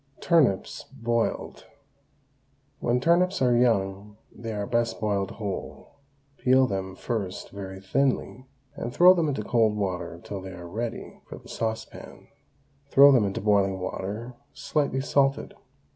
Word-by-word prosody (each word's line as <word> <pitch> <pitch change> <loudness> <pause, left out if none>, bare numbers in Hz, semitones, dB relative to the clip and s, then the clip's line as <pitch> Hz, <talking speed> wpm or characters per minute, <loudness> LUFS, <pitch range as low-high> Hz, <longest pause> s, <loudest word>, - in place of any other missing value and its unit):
TURNIPS, 145 - +1
BOILED. 115 -3 -2 1.1
When 120 +1 +1
turnips 180 +6 +2
are 125 -2 +3
young 105 -4 0
they 115 0 -7
are 105 -1 -3
best 115 0 -1
boiled 100 -3 -1
whole. 100 -3 -6 0.5
Peel 130 +1 +4
them 95 -4 -4
first 100 -6 -4
very 95 -1 -7
thinly, 130 +4 -1 0.3
and 120 - -5
throw 180 +7 +7
them 170 -4 0
into 135 -7 -2
cold 110 -1 +2
water 90 -4 -3
till 100 -2 -6
they 95 0 -8
are 85 -1 -9
ready 115 +6 -6
for - - -8
the - - -15
saucepan. 110 -1 -6 0.6
Throw 140 +1 +8
them 125 -6 +4
into 95 - -3
boiling 100 -2 +2
water 105 +6 -5 0.2
slightly 140 -3 -1
salted. 135 0 +1
115 Hz, 135 wpm, -26 LUFS, 100-130 Hz, 1.1 s, Throw